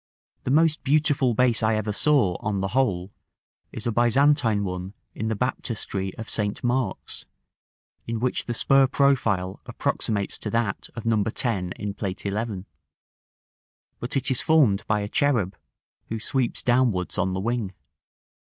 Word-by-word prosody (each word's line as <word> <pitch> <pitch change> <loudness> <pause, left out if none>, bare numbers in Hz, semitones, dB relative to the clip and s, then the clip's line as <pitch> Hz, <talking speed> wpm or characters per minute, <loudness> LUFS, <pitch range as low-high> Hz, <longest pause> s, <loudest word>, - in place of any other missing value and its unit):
The - - -1
most 155 0 +3
beautiful 140 -3 +2
base 125 -2 +3
I 110 0 +2
ever 105 -1 -1
saw, 120 -8 +3
on 105 -2 -2
the 95 0 -1
whole, 100 -7 0 0.6
is 110 - -6
a 120 - +1
Byzantine 120 -1 +3
one 90 +1 -5 0.2
in 110 - -3
the 110 - 0
Baptistery 105 -4 -2
of 110 - -6
St. 105 -1 -1
Mark's, 120 -4 -2 0.8
in 115 -1 -2
which 125 +2 -1
the 120 - -2
spur 135 +3 +4
profile 115 -10 +1
approximates 100 -3 -2
to 105 - -4
that 115 -3 -1
of 115 - -7
No. 110 -2 +2
10 110 -6 -1
in 105 -1 -5
Plate 100 -2 -4
XI.; 100 -1 -3 1.3
but 125 +3 -2
it 135 0 0
is 130 - 0
formed 135 -11 +3
by 105 -1 +1
a 100 - -3
cherub, 110 -7 +1 0.5
who 115 - -4
sweeps 125 +2 -1
downwards 120 -9 +1
on 95 +1 +1
the 95 - -2
wing. 115 -1 -1
115 Hz, 150 wpm, -25 LUFS, 100-130 Hz, 1.3 s, spur